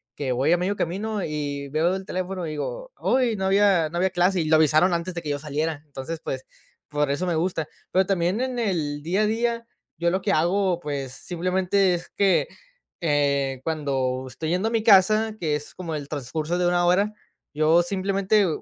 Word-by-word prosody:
que 135 Hz, -3 st, -2 dB
voy 130 Hz, +6 st, +1 dB
a 175 Hz, -, +5 dB
medio 185 Hz, +3 st, -1 dB
camino, 205 Hz, +4 st, -2 dB
y 145 Hz, -2 st, -3 dB
veo 165 Hz, +6 st, +1 dB
el 190 Hz, -, -6 dB
teléfono, 185 Hz, -1 st, -3 dB
y 155 Hz, -, -4 dB
digo: -, -, -5 dB
"Huy, 250 Hz, -3 st, +2 dB
no 190 Hz, -1 st, -2 dB
había 195 Hz, -5 st, +3 dB
no 170 Hz, -, -5 dB
había 190 Hz, +2 st, +2 dB
clase", 180 Hz, +1 st, +2 dB
y 160 Hz, -, -1 dB
lo 155 Hz, -, +4 dB
avisaron 155 Hz, +4 st, +4 dB
antes 170 Hz, +2 st, -2 dB
de 170 Hz, -, -3 dB
que 150 Hz, -, -4 dB
yo 145 Hz, 0 st, -1 dB
saliera. 150 Hz, +1 st, -2 dB
Entonces, 145 Hz, +3 st, -6 dB
pues, 130 Hz, 0 st, -4 dB, 0.4 s
por 150 Hz, -1 st, 0 dB
eso 145 Hz, +6 st, -1 dB
me 175 Hz, -, 0 dB
gusta. 160 Hz, -1 st, -1 dB, 0.2 s
Pero 190 Hz, +1 st, +3 dB
también 185 Hz, +3 st, 0 dB
en 255 Hz, -1 st, -2 dB
el 155 Hz, -9 st, -1 dB
día 185 Hz, +6 st, +1 dB
a -, -, +3 dB
día, 230 Hz, +1 st, -1 dB, 0.3 s
yo 170 Hz, 0 st, +1 dB
lo 190 Hz, +2 st, 0 dB
que 200 Hz, -, 0 dB
hago, 180 Hz, +2 st, +2 dB
pues, 140 Hz, -4 st, -4 dB
simplemente 185 Hz, +4 st, +1 dB
es 175 Hz, 0 st, -4 dB
que, 195 Hz, -3 st, +2 dB, 0.5 s
eh, 140 Hz, -4 st, +1 dB
cuando 135 Hz, -5 st, -1 dB
estoy 155 Hz, +5 st, -5 dB
yendo 185 Hz, +6 st, +1 dB
a -, -, -7 dB
mi 225 Hz, -2 st, +1 dB
casa, 215 Hz, +1 st, +5 dB
que 155 Hz, -3 st, 0 dB
es 150 Hz, 0 st, -7 dB
como 170 Hz, -3 st, -5 dB
el 145 Hz, -2 st, -4 dB
transcurso 155 Hz, +4 st, -3 dB
de 180 Hz, -, +1 dB
1 175 Hz, 0 st, +2 dB
hora, 200 Hz, +4 st, +2 dB, 0.4 s
yo 155 Hz, +3 st, +4 dB
simplemente, 195 Hz, +3 st, +1 dB
eh, 195 Hz, -, +3 dB
175 Hz, 205 wpm, -24 LUFS, 150-195 Hz, 0.5 s, a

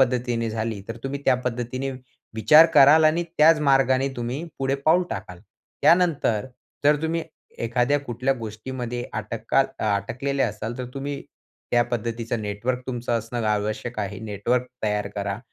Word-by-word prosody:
पद्धतीने 120 Hz, -3 st, +1 dB
झाली, 110 Hz, -1 st, -3 dB
तर 115 Hz, -, -5 dB
तुम्ही 140 Hz, +1 st, -3 dB
त्या -, -, +5 dB
पद्धतीने 125 Hz, +2 st, -3 dB, 0.4 s
विचार 150 Hz, +9 st, +7 dB
कराल 150 Hz, +4 st, +7 dB
आणि 160 Hz, +3 st, +3 dB, 0.2 s
त्याच 155 Hz, 0 st, +6 dB
मार्गाने 135 Hz, 0 st, +3 dB
तुम्ही 125 Hz, +7 st, -3 dB
पुढे 135 Hz, 0 st, 0 dB
पाऊल 165 Hz, +3 st, +5 dB
टाकाल. 90 Hz, -1 st, -6 dB, 0.4 s
त्यानंतर 155 Hz, -, +3 dB, 0.4 s
जर 150 Hz, 0 st, +4 dB
तुम्ही 165 Hz, +1 st, -1 dB, 0.4 s
एखाद्या 125 Hz, +5 st, +2 dB
कुठल्या 130 Hz, 0 st, -1 dB
गोष्टीमध्ये 120 Hz, +2 st, -5 dB
अटकाल 115 Hz, +4 st, 0 dB, 0.2 s
अटकलेले 125 Hz, +7 st, -1 dB
असाल, 110 Hz, +1 st, -3 dB
तर 125 Hz, -, -4 dB
तुम्ही 140 Hz, +1 st, -4 dB, 0.5 s
त्या 120 Hz, 0 st, +4 dB
पद्धतीचं 115 Hz, -1 st, -3 dB
नेटवर्क 110 Hz, +5 st, -2 dB
तुमचं 120 Hz, -2 st, -1 dB
असणं 115 Hz, 0 st, -4 dB
आवश्यक 105 Hz, +3 st, -2 dB
आहे. 100 Hz, -1 st, -3 dB
नेटवर्क 110 Hz, +4 st, -1 dB, 0.2 s
तयार 105 Hz, -1 st, 0 dB
करा. 100 Hz, 0 st, -2 dB
120 Hz, 140 wpm, -24 LUFS, 110-135 Hz, 0.5 s, विचार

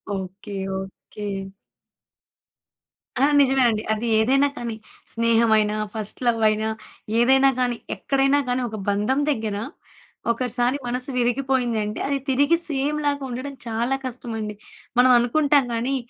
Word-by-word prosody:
Okay. 195 Hz, +2 st, -7 dB, 0.3 s
Okay. 200 Hz, +2 st, -9 dB, 1.9 s
ఆ! 260 Hz, -, +2 dB, 0.2 s
నిజమేనండి. 255 Hz, -5 st, +3 dB
అది 220 Hz, +2 st, -3 dB
ఏదైనా 270 Hz, +5 st, +3 dB
కానీ 235 Hz, -2 st, -4 dB, 0.4 s
స్నేహం 230 Hz, 0 st, +3 dB
అయినా, 210 Hz, 0 st, +1 dB, 0.2 s
ఫస్ట్ 215 Hz, -2 st, -5 dB
లవ్ 230 Hz, -1 st, +2 dB
అయినా 215 Hz, +1 st, -1 dB, 0.5 s
ఏదైనా 265 Hz, +3 st, +5 dB
కానీ 245 Hz, -1 st, 0 dB, 0.2 s
ఎక్కడైనా 275 Hz, +1 st, +2 dB
కానీ 250 Hz, +1 st, 0 dB
ఒక 220 Hz, -, -6 dB
బంధం 210 Hz, +7 st, +1 dB
దగ్గర, 220 Hz, -6 st, -2 dB, 0.8 s
ఒకసారి 245 Hz, +2 st, 0 dB
మనసు 250 Hz, +2 st, -2 dB
విరిగిపోయిందంటే 245 Hz, -4 st, 0 dB
అది 280 Hz, -, 0 dB
తిరిగి 285 Hz, +5 st, +3 dB
సేమ్ 290 Hz, +1 st, -1 dB
లాగా 285 Hz, -1 st, 0 dB
ఉండడం 255 Hz, +3 st, -5 dB
చాలా 235 Hz, +4 st, 0 dB
కష్టమండి. 225 Hz, -4 st, -4 dB, 0.4 s
మనం 255 Hz, 0 st, +6 dB
అనుకుంటాం 280 Hz, +3 st, +3 dB
కానీ 245 Hz, +4 st, -1 dB
245 Hz, 120 wpm, -23 LUFS, 220-270 Hz, 1.9 s, మనం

